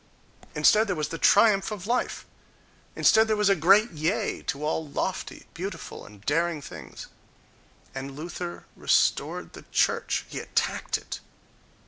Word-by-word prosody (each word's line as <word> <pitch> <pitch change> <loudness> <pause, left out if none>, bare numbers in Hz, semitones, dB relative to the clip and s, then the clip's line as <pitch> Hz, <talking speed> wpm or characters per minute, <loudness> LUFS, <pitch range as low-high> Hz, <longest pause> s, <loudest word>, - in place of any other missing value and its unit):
Instead 210 +9 +5
there 200 - -1
was 150 -2 -2
the 165 - -5
triumph 205 -1 +5
of 205 -4 -6
life! 245 +3 -1 0.7
Instead 220 0 +5
there 215 - +2
was 210 -1 +2
a 195 - +5
great 195 +7 +5
yea 175 +8 -1
to 145 +2 -3
all 155 0 -1
lofty, 185 +6 -4
beautiful 180 0 -7
and 105 -1 -16
daring 165 +1 +1
things!... 140 - -10 0.9
And 135 +1 -6
Luther 175 +2 -6
restored - - +1
the - - -12
church: - - +1
he - - -6
attacked - - -1
it.... - - -7
175 Hz, 140 wpm, -26 LUFS, 150-205 Hz, 0.9 s, Instead